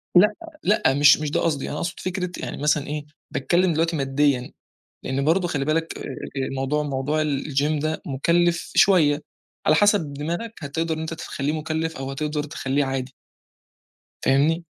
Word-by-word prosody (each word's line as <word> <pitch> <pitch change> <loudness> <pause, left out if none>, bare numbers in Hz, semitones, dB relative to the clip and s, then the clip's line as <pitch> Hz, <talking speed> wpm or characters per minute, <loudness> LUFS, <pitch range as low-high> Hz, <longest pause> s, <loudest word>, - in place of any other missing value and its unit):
لأ، 210 +4 +7 0.3
لأ 185 -9 +3
مش 145 0 +7
مش 150 -1 -3
ده - - +1
قصدي، 150 -5 -1
أنا 150 - -4
أقصد 170 +2 -3
فكرة 185 -1 -3
يعني - - -5
مثلًا 150 -1 +1
إيه، 150 0 -4 0.3
باتكلّم 175 +5 +2
دلوقتي 165 +1 +1
ماديًا، 135 -2 +1 0.5
لأن 135 +2 -1
برضه 175 +3 +3
خلّي 140 -4 -1
بالك 160 +1 -1
أ - - -9
أ - - -5 0.4
الموضوع 135 +3 -1
موضوع 145 +2 -1
الgym 145 +1 0
ده 155 0 -2
مُكلِّف 170 +5 +1
شوية، 155 -6 +5 0.4
على 155 - +5
حسب 200 -7 +3
دماغك 170 +10 -4
هتقدر 160 +3 -1
إن - - -6
أنت 160 +1 -4
تخلّيه 145 -3 -3
مُكلِّف 160 0 -2
أو 135 0 -4
هتقدر 150 +1 -2
تخلّيه 140 -2 -1
عادي. 135 0 -3 1.1
فاهمني؟ 155 +5 +3
150 Hz, 160 wpm, -23 LUFS, 140-165 Hz, 1.1 s, لأ